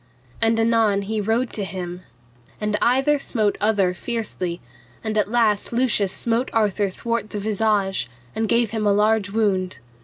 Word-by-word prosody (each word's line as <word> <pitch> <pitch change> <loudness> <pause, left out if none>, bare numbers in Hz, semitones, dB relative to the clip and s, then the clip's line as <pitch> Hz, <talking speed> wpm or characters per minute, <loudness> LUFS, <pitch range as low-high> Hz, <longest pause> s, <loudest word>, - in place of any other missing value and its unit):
And 225 0 +3
anon 225 -3 +3
he 215 +1 -2
rode 225 +4 0
to 210 - -2
him. 180 -2 -5 0.6
And 210 0 -1
either 270 +4 +3
smote 215 -6 0
other 205 -4 +2
fiercely, 185 -4 -4 0.4
and 220 -1 -2
at 210 -1 +1
last 220 -3 +2
Lucius 235 -5 +2
smote 235 +4 -1
Arthur 210 -2 +1
thwart 230 +3 -3
the 210 - -5
visage, 205 - 0 0.3
and 220 -1 -1
gave 235 -2 +2
him 220 -2 -1
a 200 - +4
large 210 0 +2
wound. 195 -4 0
215 Hz, 155 wpm, -22 LUFS, 200-230 Hz, 0.6 s, a